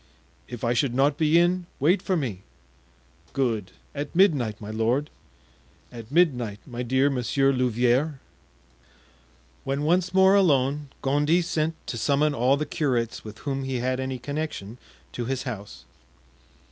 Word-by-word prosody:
"If 120 Hz, -2 st, -8 dB
I 120 Hz, 0 st, +2 dB
should 125 Hz, 0 st, 0 dB
not 140 Hz, +2 st, +3 dB
be 155 Hz, +1 st, +3 dB
in, 175 Hz, +1 st, +2 dB
wait 170 Hz, +8 st, +3 dB
for 185 Hz, -2 st, 0 dB
me." 115 Hz, -, -3 dB, 0.9 s
"Good! 115 Hz, -8 st, -1 dB, 0.2 s
at 145 Hz, +2 st, -5 dB
midnight, 140 Hz, -, +3 dB
my 105 Hz, 0 st, -7 dB
lord." 115 Hz, +7 st, 0 dB, 0.8 s
"At 115 Hz, 0 st, -10 dB
midnight, 125 Hz, -, +2 dB
my 125 Hz, -3 st, -6 dB
dear 130 Hz, +3 st, +2 dB
Monsieur 135 Hz, +2 st, +1 dB
Louvieres." 125 Hz, +4 st, +1 dB, 1.5 s
When 140 Hz, +2 st, -2 dB
once 180 Hz, +3 st, +2 dB
more 190 Hz, +1 st, +5 dB
alone 145 Hz, -6 st, +2 dB
Gondy 150 Hz, +5 st, +2 dB
sent 160 Hz, -1 st, -1 dB
to 120 Hz, -, -4 dB
summon 145 Hz, +5 st, +2 dB
all 130 Hz, +2 st, +2 dB
the 150 Hz, -, -2 dB
curates 125 Hz, -7 st, -1 dB
with 110 Hz, 0 st, -9 dB
whom 135 Hz, -1 st, -2 dB
he 135 Hz, -1 st, -3 dB
had 130 Hz, +1 st, -1 dB
any 130 Hz, 0 st, -3 dB
connection 125 Hz, -5 st, -5 dB, 0.3 s
to 120 Hz, -, -4 dB
his 130 Hz, +1 st, -2 dB
house. 100 Hz, -, -7 dB
135 Hz, 145 wpm, -25 LUFS, 120-150 Hz, 1.5 s, more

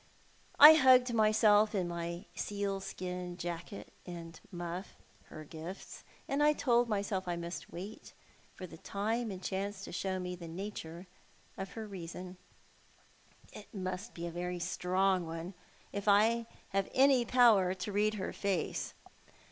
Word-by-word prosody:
I 300 Hz, +2 st, +12 dB
hugged 255 Hz, -4 st, +6 dB
myself 215 Hz, -1 st, +4 dB
in 185 Hz, -3 st, 0 dB
my 170 Hz, +1 st, -4 dB
sealskin 185 Hz, -3 st, -4 dB
jacket 175 Hz, +2 st, -6 dB
and 170 Hz, -2 st, -9 dB
muff— 175 Hz, +2 st, -6 dB, 0.3 s
her 155 Hz, -, -10 dB
gifts 165 Hz, +5 st, -9 dB
— -, -, -29 dB
and 275 Hz, +1 st, 0 dB, 0.2 s
told 240 Hz, -2 st, +3 dB
myself 200 Hz, -2 st, -1 dB
that 175 Hz, -, -2 dB
I -, -, -2 dB
must 170 Hz, +1 st, -6 dB
wait 195 Hz, +5 st, -8 dB, 0.4 s
for 185 Hz, -, -7 dB
time 215 Hz, +7 st, -3 dB
and 190 Hz, -2 st, -7 dB
chance 195 Hz, 0 st, -3 dB
to -, -, -7 dB
show 190 Hz, +1 st, -2 dB
me 180 Hz, 0 st, -4 dB
the 175 Hz, -1 st, -9 dB
nature 170 Hz, -1 st, -7 dB, 0.5 s
of 190 Hz, -1 st, -6 dB
her 220 Hz, -1 st, -6 dB
reason. 180 Hz, -1 st, -8 dB, 1.2 s
It 210 Hz, -, -11 dB
must 185 Hz, +3 st, -5 dB
be 170 Hz, -, -5 dB
a 170 Hz, -, -4 dB
very 180 Hz, +1 st, -3 dB
strong 185 Hz, +1 st, +1 dB
one 165 Hz, +3 st, -6 dB, 0.2 s
— -, -, -29 dB
if 200 Hz, +1 st, -4 dB
I 225 Hz, +3 st, +4 dB, 0.2 s
have 195 Hz, 0 st, 0 dB
any 265 Hz, -1 st, +5 dB
power 225 Hz, -7 st, +5 dB
to 190 Hz, +3 st, -5 dB
read 210 Hz, +2 st, +1 dB
her 190 Hz, -, -4 dB
face. 195 Hz, -5 st, -2 dB
190 Hz, 150 wpm, -33 LUFS, 175-210 Hz, 1.2 s, I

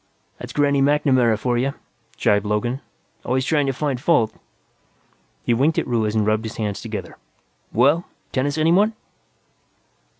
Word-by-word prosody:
"That's -, -, -7 dB
Granny 140 Hz, -1 st, +2 dB
MacNamara 135 Hz, -5 st, +3 dB
for 120 Hz, +2 st, 0 dB
you," 135 Hz, +3 st, -1 dB, 0.4 s
jibed 105 Hz, 0 st, +2 dB
Logan. 110 Hz, +6 st, -1 dB, 0.4 s
"Always 130 Hz, +1 st, 0 dB
trying 145 Hz, -2 st, +1 dB
to -, -, +2 dB
find 135 Hz, -2 st, -2 dB
fault." 145 Hz, -8 st, +2 dB, 1.1 s
He 120 Hz, -, +1 dB
winked 140 Hz, +7 st, +2 dB
at -, -, +1 dB
Ruiz 110 Hz, -3 st, 0 dB
and 110 Hz, -1 st, +2 dB
rubbed 110 Hz, +1 st, +1 dB
his 110 Hz, -, -6 dB
hands 105 Hz, -3 st, -3 dB
together. -, -, -6 dB, 0.5 s
"Well 145 Hz, -, +3 dB, 0.3 s
tennis, 140 Hz, +3 st, -1 dB
anyone?" 180 Hz, +8 st, +3 dB
130 Hz, 140 wpm, -22 LUFS, 110-145 Hz, 1.1 s, MacNamara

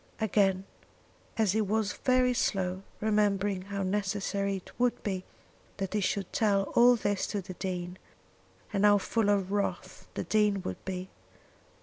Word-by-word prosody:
Again 195 Hz, -3 st, +2 dB, 0.7 s
he 220 Hz, -1 st, +2 dB
was 215 Hz, 0 st, 0 dB
very 255 Hz, -1 st, +2 dB
slow, 190 Hz, -5 st, 0 dB, 0.2 s
remembering 205 Hz, -2 st, +1 dB
how 200 Hz, +1 st, -4 dB
necessary 200 Hz, 0 st, -1 dB
it 185 Hz, -, -12 dB
would 245 Hz, -1 st, +1 dB
be 190 Hz, -3 st, -3 dB, 0.5 s
that 195 Hz, -1 st, -3 dB
he 210 Hz, -, +1 dB
should 195 Hz, 0 st, -1 dB
tell 200 Hz, -3 st, +2 dB
all 245 Hz, +1 st, +7 dB
this 205 Hz, -3 st, -1 dB
to 205 Hz, -, -2 dB
the 185 Hz, -1 st, -7 dB
Dean, 180 Hz, -1 st, -4 dB, 0.7 s
and 200 Hz, 0 st, +1 dB
how 205 Hz, 0 st, +7 dB
full 210 Hz, +1 st, 0 dB
of 195 Hz, -2 st, +1 dB
wrath 205 Hz, 0 st, -3 dB
the -, -, -2 dB
Dean 210 Hz, -3 st, +2 dB
would 90 Hz, -, -5 dB
be. 185 Hz, 0 st, -5 dB
200 Hz, 145 wpm, -29 LUFS, 190-210 Hz, 0.7 s, all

